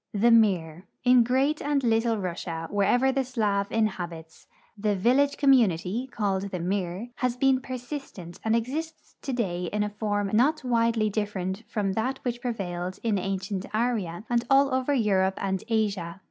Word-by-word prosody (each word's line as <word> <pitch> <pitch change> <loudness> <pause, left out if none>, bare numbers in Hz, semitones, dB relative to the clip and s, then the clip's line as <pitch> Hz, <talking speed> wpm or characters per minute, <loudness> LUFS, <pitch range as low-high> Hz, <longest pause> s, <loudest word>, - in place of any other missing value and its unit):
THE 235 +4 +4
MIR. 185 -6 +3 0.2
In 250 -1 +6
Great 265 +5 +1
and 285 -1 0
Little 225 -1 +2
Russia, 170 -3 -4
Avherever 245 +6 +2
the 270 0 +1
Slav 210 -6 -1
inhaliits, 175 -7 -3 0.3
the 210 -1 0
vil 235 +7 +3
lage 285 0 +2
community, 235 - +2
called 200 -3 -1
the 185 - -4
mir, 185 +4 -2
has 250 -1 -1
been 265 0 +3
persistent 250 - -7
and 220 0 +2
exists 310 +8 -4
today 200 -10 -2
in 210 +4 -1
a 210 - -2
form 205 -1 -2
not 275 +8 +3
widely 230 -3 +1
different 195 -2 -3
from 200 -3 -1
that 250 +6 -1
which 240 -1 -3
prevailed 185 -6 -4
in 215 -4 +1
ancient 195 +1 -3
Arya 215 -6 -1
and 240 -1 +1
all 275 0 +4
over 260 +2 0
Europe 195 -7 +2
and 190 -1 -2
Asia. 200 -6 -1
215 Hz, 160 wpm, -26 LUFS, 190-250 Hz, 0.3 s, In